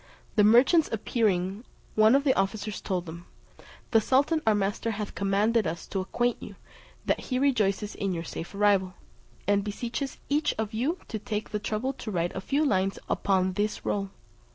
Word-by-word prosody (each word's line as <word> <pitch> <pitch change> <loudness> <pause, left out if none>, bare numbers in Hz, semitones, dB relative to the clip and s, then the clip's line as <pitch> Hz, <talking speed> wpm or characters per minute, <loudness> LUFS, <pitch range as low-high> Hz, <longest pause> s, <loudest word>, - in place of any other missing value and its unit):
The 210 - +5
merchants 255 - +5
appearing, 205 -3 0 0.3
one 220 +3 +5
of 280 - +3
the 270 -2 +4
officers 205 +1 -2
told 185 -3 -2
them, 170 +1 -9 0.6
"The 225 - +5
sultan 280 +7 +2
our 215 - +5
master 205 +3 -1
hath 210 -2 -4
commanded 205 +2 +1
us 165 +1 -4
to 195 - -2
acquaint 240 +6 -1
you, - - -9 0.5
that - - +1
he 255 - -3
rejoices 215 -6 +1
in 195 -1 -2
your 165 -2 -3
safe 170 +3 -7
arrival, 195 -2 +2 0.5
and 200 0 +3
beseeches 235 +6 -4
each 295 +1 +1
of 220 0 -3
you 270 +11 0
to 220 - -4
take 210 0 -4
the 210 - -1
trouble 215 +6 -2
to 235 - -7
write 175 -3 -1
a 190 - -3
few 285 +8 +1
lines 195 -6 +1
upon 190 -1 +1
this 210 +2 -2
roll. 195 -1 -1
210 Hz, 175 wpm, -27 LUFS, 195-240 Hz, 0.6 s, The